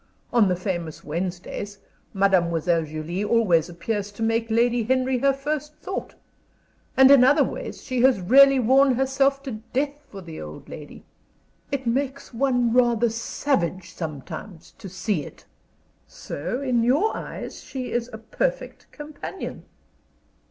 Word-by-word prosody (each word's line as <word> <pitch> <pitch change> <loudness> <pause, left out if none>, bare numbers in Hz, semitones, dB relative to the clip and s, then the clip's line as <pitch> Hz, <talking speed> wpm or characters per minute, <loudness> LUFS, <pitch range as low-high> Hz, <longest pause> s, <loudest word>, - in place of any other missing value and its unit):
On 230 -4 +5
the 180 - +1
famous 175 -4 -4
Wednesdays, 180 +5 -4 0.3
Mademoiselle 170 -4 +2
Julie 155 +5 -4
always 195 -7 +3
appears 205 +4 -3
to 225 - -5
make 225 0 0
Lady 235 +2 +2
Henry 255 +2 +1
her 275 +2 +4
first 300 +2 -4
thought. 375 +5 -6 0.8
And 265 +1 +8
in 275 -3 +8
other 285 +3 +5
ways - - -6
she 255 -2 -1
has 260 -4 +5
really 275 +8 +6
worn 260 +2 +4
herself 270 +1 +1
to 270 - -5 0.2
death 280 +2 0 0.2
for 200 - -9
the 165 -2 -8
old 75 0 -9
lady. - - -10 0.7
It 270 -2 -2
makes 265 +3 -2
one 245 -2 +1
rather 240 -2 +3
savage 205 - -2
sometimes 160 +3 -7
to 195 - -8
see 190 -3 -2
it." - - -13 0.6
"So 245 - -5
in 250 -3 +2
your 280 - +2
eyes - - -7
she 255 -2 -6
is 240 0 -1
a 220 - -7
perfect - - -3
companion?" 300 +5 -8
235 Hz, 140 wpm, -24 LUFS, 185-270 Hz, 0.8 s, And